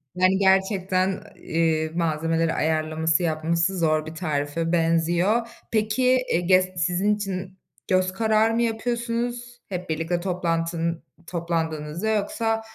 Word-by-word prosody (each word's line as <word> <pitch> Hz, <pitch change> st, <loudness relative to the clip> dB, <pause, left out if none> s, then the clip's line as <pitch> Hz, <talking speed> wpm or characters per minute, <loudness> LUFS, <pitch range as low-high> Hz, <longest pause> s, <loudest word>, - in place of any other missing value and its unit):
Yani, 185 Hz, +1 st, +3 dB
gerçekten, 190 Hz, -1 st, +2 dB, 0.2 s
eee, 160 Hz, -1 st, 0 dB
malzemeleri 165 Hz, 0 st, 0 dB
ayarlaması, 160 Hz, +1 st, +1 dB
yapması 165 Hz, +3 st, 0 dB
zor 155 Hz, -1 st, +2 dB
bir 160 Hz, +1 st, -8 dB
tarife 155 Hz, 0 st, -2 dB
benziyor. 175 Hz, +7 st, +2 dB, 0.2 s
Peki, 250 Hz, +4 st, +2 dB
e 170 Hz, -, +2 dB
gest 185 Hz, 0 st, +2 dB
sizin 185 Hz, +4 st, +2 dB
için 190 Hz, -2 st, -5 dB, 0.3 s
göz 185 Hz, 0 st, +2 dB
kararı 220 Hz, +1 st, +2 dB
mı 235 Hz, -, +1 dB
yapıyorsunuz, 240 Hz, +1 st, -2 dB
hep 180 Hz, -2 st, -5 dB
birlikte 165 Hz, +2 st, -1 dB
toplantının 170 Hz, -2 st, -1 dB, 0.2 s
toplandığınızda, 165 Hz, +1 st, -2 dB
yoksa, 225 Hz, +1 st, 0 dB
180 Hz, 115 wpm, -24 LUFS, 165-210 Hz, 0.3 s, Yani